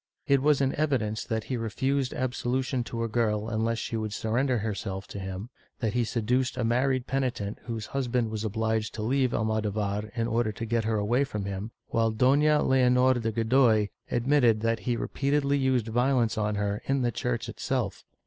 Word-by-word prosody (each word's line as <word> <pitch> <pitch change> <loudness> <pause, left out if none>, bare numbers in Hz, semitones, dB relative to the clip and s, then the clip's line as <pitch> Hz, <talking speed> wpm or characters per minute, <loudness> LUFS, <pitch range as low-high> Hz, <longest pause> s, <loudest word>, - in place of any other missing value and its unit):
It 140 -1 +3
was 145 0 +3
in 135 -1 +2
evidence 125 -8 0
that 110 -2 -2
he 125 - -3
refused 130 +4 -1
absolution 130 0 -1
to 115 0 -3
a - - 0
girl 110 -2 0
unless 115 +1 0
she 115 - -4
would 110 -2 -2
surrender 125 +4 0
herself 100 -3 -3
to 100 - -6
him, 95 +5 -6 0.3
that 110 -3 -1
he 120 0 +2
seduced 120 +3 0
a 125 - 0
married 125 +2 +1
penitent 125 -6 -2
whose 115 -3 -4
husband 125 -4 -1
was 110 -1 -3
obliged 110 0 -1
to 105 - -4
leave 130 +2 +1
Almodovar 105 -1 -1
in 115 -1 0
order 115 -1 0
to 110 +2 -5
get 115 -1 0
her 110 -1 +1
away 115 +6 +2
from 105 -7 -4
him, 100 +2 -4 0.2
while 115 -1 +2
Doiia 145 +6 +3
Leonor 130 0 +4
de 115 -1 -1
Godoy 115 -2 +3 0.2
admitted 120 -3 +3
that 115 0 +1
he 120 -2 -1
repeatedly 140 +2 0
used 130 -4 +2
violence 120 0 +2
on 105 -1 0
her 100 0 -1
in 135 -1 +1
the 120 - +1
church 120 +1 -2
itself. 115 -1 -3
115 Hz, 185 wpm, -28 LUFS, 110-130 Hz, 0.3 s, Leonor